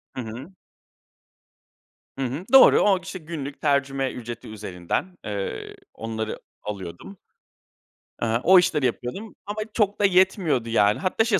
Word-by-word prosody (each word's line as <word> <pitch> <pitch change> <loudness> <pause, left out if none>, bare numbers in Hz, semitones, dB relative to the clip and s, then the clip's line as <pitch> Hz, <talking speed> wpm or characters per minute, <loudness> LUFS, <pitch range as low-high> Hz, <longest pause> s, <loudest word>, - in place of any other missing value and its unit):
Hı 130 - -3
hı. 120 - -8 1.7
Hı 135 - -1
hı, 140 +9 -4
doğru, 270 - +9
o, 200 -2 +5
k 185 - -5
işte, 190 0 -6
günlük 150 -4 -7
tercüme 140 -2 +1
ücreti 120 -1 -7
üzerinden, 105 - -4
eee, 100 -2 -4 0.2
onları 110 -1 -4 0.2
alıyordum. 100 - -7 1.0
Eee, 115 0 +1
o 185 0 +8
işleri 150 -5 +1
yapıyordum 125 - -3
ama 205 +1 -5 0.2
çok 205 -2 +1
da - - +5
yetmiyordu 180 - +2
yani. 105 -2 +3
Hatta 195 +4 +1
şey, 215 -4 +2
135 Hz, 135 wpm, -24 LUFS, 115-185 Hz, 1.7 s, doğru